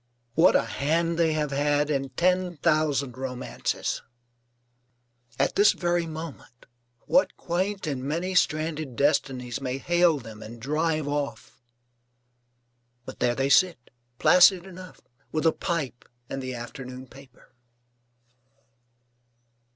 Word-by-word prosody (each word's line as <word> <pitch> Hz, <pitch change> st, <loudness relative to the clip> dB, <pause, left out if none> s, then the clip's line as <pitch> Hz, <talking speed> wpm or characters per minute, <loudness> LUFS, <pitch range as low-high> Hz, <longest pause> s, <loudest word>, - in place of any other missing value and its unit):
What 165 Hz, +7 st, +5 dB
a -, -, +4 dB
hand 165 Hz, +3 st, 0 dB
they 165 Hz, -2 st, +3 dB
have 150 Hz, -2 st, -1 dB
had 145 Hz, +1 st, +1 dB
in 135 Hz, -1 st, -1 dB
ten 180 Hz, +4 st, +1 dB
thousand 145 Hz, -5 st, +1 dB
romances. 130 Hz, -1 st, -3 dB, 1.4 s
At 135 Hz, -, +1 dB
this 205 Hz, -, +6 dB
very 175 Hz, -1 st, 0 dB
moment, 155 Hz, -6 st, -9 dB, 0.4 s
what 275 Hz, -, +2 dB
quaint 185 Hz, +3 st, -2 dB
and 135 Hz, -4 st, -3 dB
many 170 Hz, +7 st, -2 dB
stranded 155 Hz, -5 st, 0 dB
destinies 135 Hz, -3 st, 0 dB
may 130 Hz, -1 st, -2 dB
hail 175 Hz, +1 st, +3 dB
them 110 Hz, -4 st, -10 dB
and 115 Hz, +2 st, -10 dB
drive 155 Hz, +3 st, -1 dB
off? 145 Hz, -3 st, -4 dB, 1.4 s
But -, -, -9 dB
there 120 Hz, 0 st, +1 dB
they 135 Hz, +1 st, 0 dB
sit, 170 Hz, -6 st, +3 dB, 0.3 s
placid 180 Hz, +3 st, +6 dB
enough, 185 Hz, -1 st, -11 dB, 0.3 s
with 155 Hz, +1 st, -1 dB
a 160 Hz, -, +6 dB
pipe 150 Hz, -9 st, -4 dB, 0.2 s
and 135 Hz, -, -5 dB
the 130 Hz, -1 st, -5 dB
afternoon 125 Hz, +2 st, -8 dB
paper. 130 Hz, 0 st, -18 dB
150 Hz, 120 wpm, -26 LUFS, 130-170 Hz, 1.4 s, this